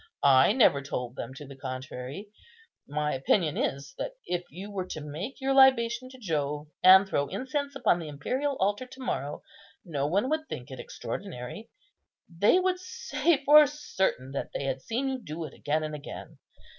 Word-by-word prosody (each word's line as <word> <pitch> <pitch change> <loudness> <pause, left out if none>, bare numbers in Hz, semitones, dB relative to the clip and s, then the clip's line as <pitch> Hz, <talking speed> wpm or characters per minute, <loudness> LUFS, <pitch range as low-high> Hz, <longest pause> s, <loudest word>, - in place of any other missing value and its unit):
I 135 +3 +6
never 220 - +5
told 125 -3 -4
them 130 - -6
to 145 - -9
the 140 0 -11
contrary. 130 +6 -6 0.6
My 150 +1 -1
opinion 150 +4 +1
is, 140 - -2
that - - -3
if 180 0 -2
you 195 +4 -8
were 190 -2 -3
to 155 - -5
make 155 - -6
your 270 0 +1
libation 255 -2 +5
to 260 - -13
Jove, 150 - -2
and 190 +1 +9
throw 145 -6 0
incense 280 - -3
upon 245 -9 +2
the 165 - -6
imperial 255 - -2
altar 205 +6 0
to 260 +1 -14
morrow, 145 - -3 0.4
no 145 -5 -1
one 200 +10 +1
would 315 0 -1
think 125 +1 -7
it 130 - -8
extraordinary. 185 - -6 0.6
They 195 - +3
would 370 0 +1
say 340 -4 0
for 300 +1 +9
certain 190 - -2
that 140 - -4
they - - -2
had 135 -1 -2
seen 240 - -2
you 265 -1 -2
do 165 -4 -6
it 150 - -9
again 155 +2 -1
and 155 0 -4
again. 150 -1 -8
180 Hz, 180 wpm, -28 LUFS, -, 0.6 s, and